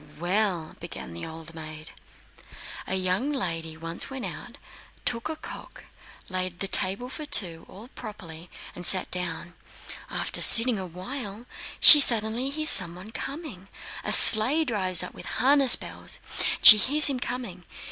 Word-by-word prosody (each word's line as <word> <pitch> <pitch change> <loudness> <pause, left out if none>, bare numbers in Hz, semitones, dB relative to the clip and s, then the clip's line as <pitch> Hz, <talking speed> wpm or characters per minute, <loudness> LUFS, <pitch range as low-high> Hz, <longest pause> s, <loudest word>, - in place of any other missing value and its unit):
"Well," 180 -2 -3
began 85 - -10
the 85 - -9
old 160 0 -10
maid, 155 -1 -10 1.0
"a 190 - -3
young 185 +9 -2
lady 165 - -6
once 165 +1 -7
went 265 -2 -8
out, - - -11 0.5
took 235 +4 -4
a 320 - -5
cock, 405 - -12 0.4
laid 185 -2 -5
the 195 - -3
table 195 +6 -1
for 285 +4 -10
two, 170 - +2
all 215 +5 -13
properly, 170 -7 -12 0.3
and 175 - -11
sat 185 +1 +1
down. 175 -1 -5 0.6
After - - -2
sitting 230 -2 +6
a 185 - -8
while, 205 +5 -9 0.3
she 300 - +9
suddenly 235 0 +3
hears 310 +2 -3
someone 180 +3 +1
coming... 265 - -9 0.4
a - - -2
sleigh 260 +9 +3
drives 190 - -3
up - - -9
with - - -13
harness 270 +1 +5
bells; - - -5 0.5
she 215 - +11
hears 290 +7 +3
him 270 -3 +2
coming! 240 -8 -8
195 Hz, 145 wpm, -23 LUFS, 175-250 Hz, 1.0 s, she